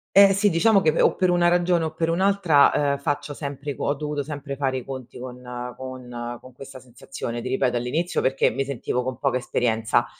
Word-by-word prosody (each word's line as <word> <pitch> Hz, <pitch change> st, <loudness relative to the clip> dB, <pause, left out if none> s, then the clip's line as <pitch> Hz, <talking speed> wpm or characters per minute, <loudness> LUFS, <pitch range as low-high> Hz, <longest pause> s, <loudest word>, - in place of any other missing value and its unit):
Eh 195 Hz, 0 st, +8 dB
sì, 205 Hz, +1 st, +3 dB
diciamo 195 Hz, +4 st, +4 dB
che 155 Hz, -1 st, +2 dB
o -, -, +4 dB
per 185 Hz, -1 st, +1 dB
una 175 Hz, -1 st, +3 dB
ragione 175 Hz, -1 st, +2 dB
o 160 Hz, -, -4 dB
per 165 Hz, +1 st, -1 dB
un'altra, 180 Hz, -5 st, +4 dB, 0.2 s
ehm, 140 Hz, -, -1 dB
faccio 145 Hz, +1 st, -3 dB
sempre 140 Hz, 0 st, -5 dB
co -, -, -3 dB
ho 140 Hz, -, +2 dB
dovuto 150 Hz, 0 st, -3 dB
sempre 140 Hz, -1 st, -6 dB
fare 135 Hz, -1 st, -1 dB
i 125 Hz, -, -10 dB
conti 130 Hz, -3 st, -8 dB
con 125 Hz, 0 st, -8 dB, 0.4 s
con 125 Hz, -2 st, -7 dB
con 130 Hz, -, -14 dB
questa 130 Hz, 0 st, -11 dB
sensazione, 120 Hz, -1 st, -7 dB
ti 125 Hz, -, -6 dB
ripeto 125 Hz, -1 st, +1 dB
all'inizio 155 Hz, +9 st, -1 dB
perché 135 Hz, +1 st, +2 dB
mi 135 Hz, 0 st, -2 dB
sentivo 125 Hz, -2 st, -2 dB
con 130 Hz, -1 st, -4 dB
poca 135 Hz, -2 st, +1 dB
esperienza, 120 Hz, -2 st, 0 dB
140 Hz, 205 wpm, -24 LUFS, 125-165 Hz, 0.4 s, Eh